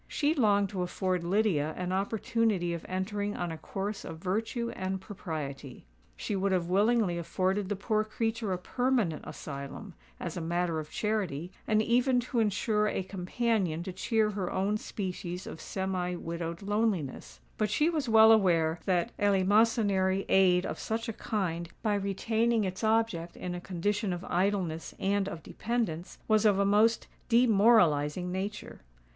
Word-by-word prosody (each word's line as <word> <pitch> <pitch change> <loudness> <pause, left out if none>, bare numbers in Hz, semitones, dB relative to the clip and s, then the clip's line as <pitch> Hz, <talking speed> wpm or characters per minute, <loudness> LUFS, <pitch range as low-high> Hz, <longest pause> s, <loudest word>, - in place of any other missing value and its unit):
She 295 +1 +1
longed 205 - +3
to 190 -3 -3
afford 180 0 -1
Lydia 170 -5 +1
an 180 0 -3
opportunity 205 -2 0
of 170 - -5
entering 205 +2 -2
on 175 -1 -2
a 160 - -5
course 200 +5 -4
of 160 - -7
virtue 225 +7 -2
and 190 0 -3
propriety. 150 - -6 0.3
She 210 - -3
would 195 0 0
have 180 -2 +1
willingly 200 -1 +2
afforded 185 +3 -1
the 205 - 0
poor 215 +2 0
creature 225 0 -2
a 185 - 0
permanent 235 -4 0
asylum, 140 +7 -7 0.3
as 170 - -5
a 175 - -3
matter 170 0 -1
of 155 -1 -7
charity, 190 -7 -2 0.2
and 215 0 +3
even 250 +2 +3
to 245 0 -2
insure 210 0 +1
a 195 - -1
companion 185 -2 -1
to 185 - -6
cheer 215 +3 +1
her 195 -3 -3
own 200 +3 0
species 180 -3 -5
of 160 - -8
semi 185 -2 -2
widowed 170 +1 -5
loneliness; 195 - -1 0.2
but 215 - +1
she 300 +10 +2
was 305 -7 -1
well 220 0 +8
aware 170 -6 +3
that 185 +4 0
eleemosynary 200 -1 +3
aid 185 -1 +4
of - - -4
such 225 +1 -3
a - - -3
kind, 175 -6 -2
by 215 -2 +2
retaining 220 +3 +1
its 185 +2 -4
object 220 -6 +1
in 180 - -4
a 175 - -5
condition 200 +3 -1
of 175 +1 -5
idleness 180 -3 -1
and 200 0 +1
of 170 -5 -8
dependence, 215 -8 -3
was 215 -1 +4
of 205 -3 +4
a 200 - +2
most 215 +3 +3 0.2
demoralising 195 -9 +4
nature. 195 +3 -5
195 Hz, 160 wpm, -30 LUFS, 175-220 Hz, 0.3 s, well